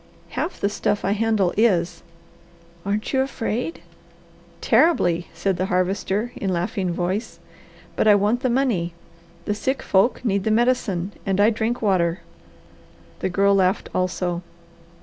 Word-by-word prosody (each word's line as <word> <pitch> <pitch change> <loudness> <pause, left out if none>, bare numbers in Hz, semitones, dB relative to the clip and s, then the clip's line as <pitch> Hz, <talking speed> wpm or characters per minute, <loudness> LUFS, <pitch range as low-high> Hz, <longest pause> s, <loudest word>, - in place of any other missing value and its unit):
"Half 290 - -3
the - - +1
stuff 205 -1 -1
I 195 - +1
handle 210 -3 +1
is." 180 -6 +2 0.9
"Aren't 210 +5 -2
you 265 - +3
afraid?" 255 +2 -3 0.8
"Terribly," 175 - +3
said 175 +3 -1
the 185 +1 -1
Harvester 195 +5 0
in 195 - -2
laughing 180 +1 -1
voice. 185 +6 -2 0.6
"But - - +1
I 210 - +7
want 205 +4 +2
the 255 0 0
money, 230 -10 0 0.5
the 210 - 0
sick 265 +6 -2
folk 200 +6 +2
need 200 -3 +1
the 220 - 0
medicine, 215 -5 +1
and 195 -1 -1
I 210 +3 +5
drink 230 +2 -2
water." 175 -4 +1 1.0
The - - -1
Girl 200 +2 +3
laughed 190 -1 +1
also. 180 -1 -1
200 Hz, 140 wpm, -22 LUFS, 180-225 Hz, 1.0 s, I